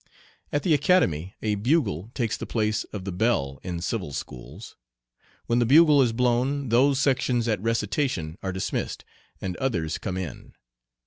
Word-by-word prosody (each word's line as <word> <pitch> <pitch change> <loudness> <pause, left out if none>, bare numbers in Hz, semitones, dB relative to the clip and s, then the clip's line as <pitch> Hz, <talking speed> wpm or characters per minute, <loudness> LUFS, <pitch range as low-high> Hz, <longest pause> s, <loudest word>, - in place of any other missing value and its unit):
At 145 - 0
the 175 - +3
Academy 130 - +2
a 105 -1 +1
bugle 105 - 0
takes 115 -4 0
the - - -6
place 110 -1 0
of 100 -3 -8
the 95 - -3
bell 90 - 0
in 90 -2 -5
civil 90 -4 -3
schools. 65 -2 -8 0.7
When 120 +1 +1
the - - +4
bugle 150 +1 +7
is 125 -3 +3
blown 125 +3 0
those 130 +4 +4
sections 125 -4 +1
at 110 -4 0
recitation 105 - -1
are 95 - -2
dismissed, 95 0 -3 0.4
and 90 -2 -3
others 85 -12 -1
come 95 -3 -4
in. 90 -5 -7
115 Hz, 155 wpm, -25 LUFS, 90-130 Hz, 0.7 s, bugle